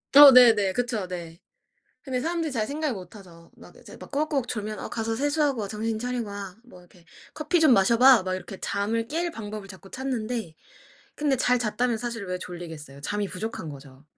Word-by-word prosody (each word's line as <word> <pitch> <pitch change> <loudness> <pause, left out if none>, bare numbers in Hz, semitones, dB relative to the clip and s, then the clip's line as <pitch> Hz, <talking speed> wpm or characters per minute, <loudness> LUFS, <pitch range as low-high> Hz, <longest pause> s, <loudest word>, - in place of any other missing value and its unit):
어 285 -1 +12
네네. 225 -6 +6
그쵸. 235 -5 -2
네. 170 -2 -7 0.6
근데 260 -3 -3
사람들이 330 +2 -2
잘 225 -5 -1
생각을 295 0 -2
못하죠. 180 -3 -13
막 - - -16
이제 - - -13
막 - - -12
꾸벅꾸벅 285 -3 -1
졸면 215 -1 -4
"어 - - -6
가서 225 -1 -2
세수하고 290 -1 0
와. 205 - -3
정신 220 +2 -3
차리고 245 -1 -3
와." 200 -2 -7
뭐 240 -7 -16
이렇게 175 -1 -21 0.3
"커피 310 +3 +1
좀 315 -4 +5
마셔 195 +3 +4
봐." 255 -5 +7
막 185 0 -2
이렇게 185 +1 -6
잠을 225 +3 -2
깰 335 +5 -2
방법을 215 -5 -7
자꾸 195 0 -13
찾는데, 240 -8 -4 0.6
근데 290 -2 +1
잘 250 0 +2
잤다면 235 +1 0
사실 230 -3 -5
왜 180 0 -3
졸리겠어요. 160 -6 -9
잠이 205 +7 -2
부족한 195 -5 -5
거죠. 135 -1 -13
220 Hz, 375 characters per minute, -26 LUFS, 190-255 Hz, 0.6 s, 어